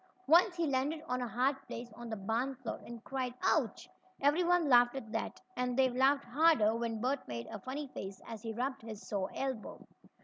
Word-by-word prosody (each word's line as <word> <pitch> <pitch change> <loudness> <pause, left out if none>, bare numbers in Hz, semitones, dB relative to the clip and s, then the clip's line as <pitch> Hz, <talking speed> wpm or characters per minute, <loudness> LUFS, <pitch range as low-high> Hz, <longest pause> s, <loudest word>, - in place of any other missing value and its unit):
Once 345 +4 +6
he 340 -1 0
landed 280 +2 0
on 250 0 -1
a 245 - -1
hard 255 +4 +1
place 235 -1 -7
on 240 +1 -8
the 220 - -2
barn 225 +7 -1
floor, 250 -3 -6
and 235 -1 -9
cried: 255 -2 -3
"Ouch!" - - +1 0.3
Everyone 340 +3 +3
laughed 245 -1 +6
at 230 -5 -6
that, - - -3 0.2
and 250 0 -1
they 265 -1 +5
laughed 270 +3 +3
harder 245 -4 +4
when 230 -1 -2
Bert 260 +4 -1
made 115 -1 -4
a 215 - -5
funny 270 +7 -4
face 195 -5 -7
as 225 -2 -7
he 225 -1 -4
rubbed 260 +4 -2
his 220 -2 -9
sore 195 -2 -1
elbow. 265 -5 -4
250 Hz, 200 wpm, -33 LUFS, 225-275 Hz, 0.3 s, Once